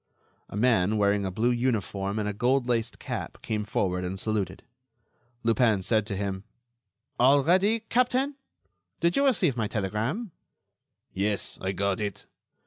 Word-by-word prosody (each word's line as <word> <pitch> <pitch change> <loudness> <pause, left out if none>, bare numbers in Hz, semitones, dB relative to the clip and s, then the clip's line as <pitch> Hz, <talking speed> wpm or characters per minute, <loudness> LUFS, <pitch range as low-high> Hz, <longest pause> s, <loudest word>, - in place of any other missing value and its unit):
A - - -6
man, 110 -3 +3
wearing 100 -1 +2
a - - -1
blue 110 +6 +1
uniform 110 -5 -1
and 105 -1 -1
a 105 - -2
goldlaced 120 0 +1
cap, - - -5
came 105 -1 -2
forward 90 -3 -1
and 95 +1 -4
saluted. 100 -4 -2 0.8
Lupin 115 -4 +3
said 110 +1 +1
to 100 - -3
him: 95 -1 -3 0.8
"All 135 +3 +5
ready, 195 +8 +3
captain? 250 +5 +1 0.7
Did 170 +1 +2
you 280 - +3
receive 180 - +2
my 110 -3 -1
telegram?" 110 - -2 0.8
"Yes, 100 +1 -1
I 95 - -1
got 100 +2 0
it." 100 -2 -4
110 Hz, 140 wpm, -27 LUFS, 100-130 Hz, 0.8 s, All